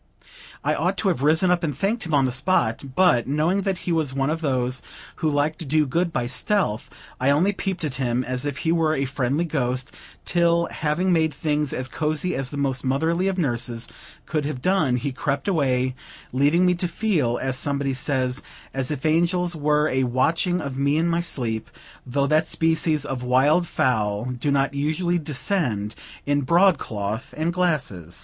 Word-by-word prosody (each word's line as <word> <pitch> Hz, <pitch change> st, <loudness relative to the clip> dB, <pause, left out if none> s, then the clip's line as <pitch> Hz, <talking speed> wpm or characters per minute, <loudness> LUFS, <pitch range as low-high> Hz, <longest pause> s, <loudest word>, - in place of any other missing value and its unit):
I -, -, +1 dB
ought -, -, 0 dB
to -, -, +1 dB
have 125 Hz, -, -1 dB
risen 160 Hz, +5 st, +3 dB
up 175 Hz, -1 st, +1 dB
and 145 Hz, -5 st, -2 dB
thanked 205 Hz, +2 st, -1 dB
him 160 Hz, -, -4 dB
on 135 Hz, -2 st, +4 dB
the 130 Hz, -, 0 dB
spot; 130 Hz, -4 st, +1 dB
but, 175 Hz, -12 st, +4 dB
knowing 155 Hz, +8 st, +1 dB
that 195 Hz, -1 st, -1 dB
he 180 Hz, -, -1 dB
was 155 Hz, -5 st, 0 dB
one 135 Hz, +2 st, +1 dB
of 160 Hz, +1 st, -2 dB
those 130 Hz, -3 st, -1 dB, 0.4 s
who 155 Hz, -, 0 dB
like 145 Hz, +1 st, 0 dB
to 170 Hz, -, -6 dB
do 150 Hz, +2 st, +2 dB
good 170 Hz, +6 st, 0 dB
by 125 Hz, -6 st, -1 dB
stealth, 130 Hz, -, 0 dB, 0.3 s
I 130 Hz, -, +2 dB
only 170 Hz, +8 st, +3 dB
peeped 190 Hz, -2 st, -3 dB
at 150 Hz, -4 st, -2 dB
him 125 Hz, 0 st, 0 dB
as 125 Hz, 0 st, -2 dB
if 145 Hz, -1 st, -3 dB
he 160 Hz, -, +3 dB
were 160 Hz, -2 st, +2 dB
a 135 Hz, -, 0 dB
friendly 140 Hz, +4 st, -1 dB
ghost; 130 Hz, -4 st, -2 dB, 0.3 s
till, 170 Hz, -1 st, +2 dB
having 170 Hz, +5 st, 0 dB
made 160 Hz, -2 st, +1 dB
things 150 Hz, -2 st, -1 dB
as 130 Hz, 0 st, -2 dB
cozy 155 Hz, +5 st, -1 dB
as 135 Hz, -2 st, -2 dB
the 145 Hz, -, -6 dB
most 135 Hz, -2 st, -1 dB
motherly 160 Hz, +8 st, +1 dB
of 190 Hz, -1 st, -1 dB
nurses 120 Hz, -6 st, -1 dB, 0.4 s
could 155 Hz, -2 st, -1 dB
have 145 Hz, -3 st, -3 dB
done, 160 Hz, -5 st, +2 dB
he 135 Hz, +3 st, -2 dB
crept 140 Hz, +3 st, -2 dB
away, 130 Hz, -8 st, +1 dB, 0.4 s
leaving 145 Hz, +7 st, +3 dB
me 180 Hz, -, +4 dB
to 180 Hz, +1 st, -2 dB
feel, 165 Hz, -, 0 dB
as 130 Hz, -1 st, -2 dB
somebody 140 Hz, 0 st, 0 dB
says, 130 Hz, -1 st, 0 dB, 0.3 s
"as 135 Hz, -1 st, -1 dB
if 150 Hz, -1 st, -4 dB
angels 175 Hz, +2 st, +2 dB
were 150 Hz, 0 st, +2 dB
a 130 Hz, -2 st, +1 dB
watching 165 Hz, +8 st, +1 dB
of 140 Hz, -3 st, -5 dB
me 140 Hz, +2 st, +2 dB
in 165 Hz, +2 st, +2 dB
my 170 Hz, 0 st, +1 dB
sleep;" 115 Hz, -9 st, -2 dB, 0.4 s
though 140 Hz, +3 st, +1 dB
that 155 Hz, +2 st, +2 dB
species 160 Hz, -2 st, +1 dB
of 135 Hz, -3 st, -4 dB
wild 135 Hz, +8 st, +3 dB
fowl 105 Hz, -6 st, 0 dB
do 125 Hz, +3 st, -2 dB
not 140 Hz, 0 st, +1 dB
usually 160 Hz, +5 st, 0 dB
descend 140 Hz, -, 0 dB, 0.3 s
in 145 Hz, 0 st, +1 dB
broadcloth 130 Hz, -, +1 dB
and 165 Hz, +2 st, 0 dB
glasses. 140 Hz, -, -1 dB
145 Hz, 190 wpm, -23 LUFS, 130-170 Hz, 0.4 s, on